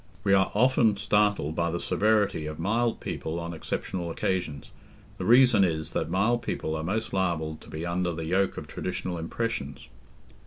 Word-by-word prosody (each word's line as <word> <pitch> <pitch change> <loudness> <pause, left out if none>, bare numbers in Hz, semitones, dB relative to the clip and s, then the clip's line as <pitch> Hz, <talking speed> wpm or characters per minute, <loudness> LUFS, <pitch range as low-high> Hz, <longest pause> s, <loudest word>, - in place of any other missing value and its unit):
We 100 - +3
are 95 0 +4
often 115 -2 +4
startled 105 -6 +1
by 85 0 +1
the 85 +1 -2
severity 105 -8 +1
of 75 0 -6
mild 115 +7 0
people 80 +2 -4
on 85 0 -5
exceptional 85 +2 -4
occasions; 85 -4 -2 0.5
the - - -3
reason 120 -3 +6
is, 80 -2 -1
that - - -2
mild 110 +7 +2
people 80 -8 -3
are 80 - -2
most 110 +6 -2
liable 85 -5 0
to - - -16
be 80 +2 -5
under 85 0 0
the 80 -1 -5
yoke 95 +4 +1
of - - -5
traditional 90 -1 -4
impressions. 80 - -4
90 Hz, 170 wpm, -27 LUFS, 80-105 Hz, 0.5 s, reason